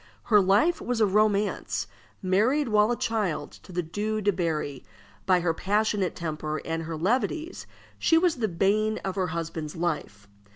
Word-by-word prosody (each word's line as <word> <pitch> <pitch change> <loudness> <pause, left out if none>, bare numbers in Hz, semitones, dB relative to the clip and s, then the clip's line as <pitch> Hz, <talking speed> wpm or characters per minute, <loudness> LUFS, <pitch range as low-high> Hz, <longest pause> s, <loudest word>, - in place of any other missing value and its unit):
Her 210 -3 +5
life 205 - +3
was 245 -2 -2
a 220 - +5
romance. 210 0 +1 0.4
Married 230 +10 +2
while 210 0 +4
a 240 - +1
child 210 -8 -1
to - - -14
the 180 0 -1
Due 210 +6 -2
de 205 0 +2
Berri, 155 -6 -2 0.4
by 180 -2 +4
her 170 -1 +1
passionate 205 0 0
temper 155 -2 -3
and 165 0 -2
her 165 0 -5
levities 260 - -1 0.3
she 325 - +4
was 335 -3 +2
the 225 -3 0
bane 210 +4 +1
of 190 - -1
her 185 -1 -1
husband's 160 -2 -4
life. 150 - -3
195 Hz, 165 wpm, -27 LUFS, 165-215 Hz, 0.4 s, Her